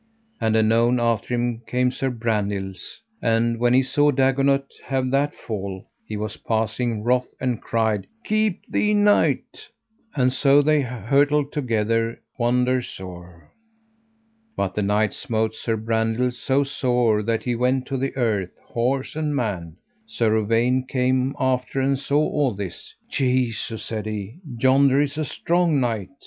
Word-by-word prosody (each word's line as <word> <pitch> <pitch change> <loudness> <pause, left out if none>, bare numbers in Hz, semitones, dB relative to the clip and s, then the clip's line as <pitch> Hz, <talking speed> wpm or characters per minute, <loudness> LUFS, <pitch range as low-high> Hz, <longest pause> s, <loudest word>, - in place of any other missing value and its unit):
And 110 -1 +1
anon 115 +3 +3
after 115 0 0
him 120 -1 -1
came 125 +1 +1
Sir 135 +1 -2
Brandiles, 105 - -3 0.2
and 115 0 +1
when 120 +1 +3
he 130 - +5
saw 145 +3 +2
Dagonet 135 0 +2 0.2
have 130 -2 -1
that 140 +2 +1
fall 100 -4 -6 0.2
he 105 - -4
was 105 0 -4
passing 115 0 -1
wroth, 125 +2 +2
and 125 -3 -1
cried: 110 -3 0 0.2
Keep 215 -3 0
thee, 210 0 +1
knight, 205 0 +2 0.5
and 130 -2 +2
so 140 +1 +4
they 155 0 +3
hurtled 140 +3 +1
together 115 -3 0 0.2
wonder 125 +1 +2
sore. 90 -5 -10 1.1
But 95 -2 -1
the 105 - -1
knight 105 +2 +1
smote 110 -1 -1
Sir 110 0 -2
Brandiles 115 +2 0
so 140 +1 +2
sore 125 -5 +1
that 115 +1 -1
he 125 - -1
went 125 +2 +1
to 135 -1 -3
the 135 +1 -2
earth, 105 -8 -1
horse 130 +4 -1
and 155 -2 -1
man. 95 - -3 0.3
Sir 115 - +1
Uwaine 115 +4 +2
came 130 0 +1
after 130 0 0
and 135 0 +1
saw 140 +1 0
all 140 -7 0
this. 95 -4 -7
Jesu, 125 -4 0
said 110 -1 -5
he, 105 - -5 0.2
yonder 135 +2 +4
is 145 +1 0
a 155 - 0
strong 170 0 +1
knight. 115 -6 -1
120 Hz, 145 wpm, -23 LUFS, 110-135 Hz, 1.1 s, he